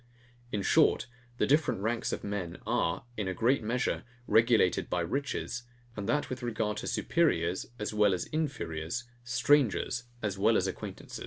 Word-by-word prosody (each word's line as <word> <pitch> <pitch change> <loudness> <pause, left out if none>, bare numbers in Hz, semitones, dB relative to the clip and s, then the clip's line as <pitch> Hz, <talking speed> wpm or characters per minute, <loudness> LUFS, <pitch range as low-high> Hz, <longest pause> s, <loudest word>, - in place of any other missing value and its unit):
In 100 -2 -1
short, 155 +2 +4 0.3
the - - +3
different 145 -8 +2
ranks 115 +2 -1
of - - -3
men 100 -4 -3
are, 85 +7 0
in 105 -3 -1
a 95 - -2
great 125 +4 +3
measure, 120 +3 -1 0.2
regulated 115 -5 +3
by 90 - 0
riches; 130 +4 -2 0.3
and 105 0 -4
that 145 +4 +1
with 130 0 -5
regard 110 -3 -1
to - - -4
superiors 95 - +1
as 105 -1 -3
well 105 -2 +4
as 90 - -3
inferiors, 115 - -2 0.2
strangers 120 -1 +2 0.2
as 100 -2 -2
well 110 +3 +4
as 95 - +1
acquaintance. 95 - -6
110 Hz, 160 wpm, -30 LUFS, 95-125 Hz, 0.3 s, short